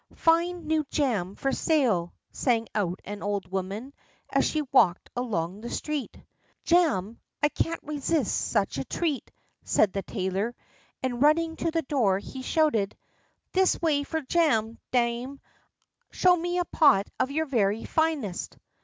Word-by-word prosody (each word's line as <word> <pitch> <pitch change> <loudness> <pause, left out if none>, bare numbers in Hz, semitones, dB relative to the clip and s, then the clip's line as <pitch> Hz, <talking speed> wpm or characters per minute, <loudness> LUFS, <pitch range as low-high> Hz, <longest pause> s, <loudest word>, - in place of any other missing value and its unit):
"Fine 340 +1 +2
new 315 0 +1
jam 210 - 0
for 270 - -1
sale," 235 - +1 0.2
sang 230 -3 +1
out 190 -4 -1
an 205 0 -6
old 200 -2 -3
woman, 195 +8 -4 0.4
as - - +3
she 310 -1 -1
walked 185 -9 +3
along 205 -6 -2
the 235 - -6
street. 300 -1 -4 0.5
"Jam! 290 - +2 0.2
I 295 - +5
can't 330 +2 -2
resist 295 -2 0
such 200 - 0
a - - -1
treat," 300 - -2 0.3
said 200 - +2
the 195 - -1
tailor; 195 +4 -2 0.5
and, 245 -2 -2
running 325 +2 +3
to 335 - 0
the 325 0 -1
door, 235 -9 +2
he 260 +6 -8
shouted: 255 -9 +1 0.5
"This 375 0 +3
way 310 -4 +2
for 320 +2 -3
jam, 255 -8 +1
dame; 245 +2 0 0.7
show 360 -1 +4
me 350 +1 -2
a 355 - +1
pot 205 - +4
of 260 - +1
your 315 +3 0
very 225 -5 +1
finest." 310 - -1
260 Hz, 145 wpm, -27 LUFS, 205-315 Hz, 0.7 s, I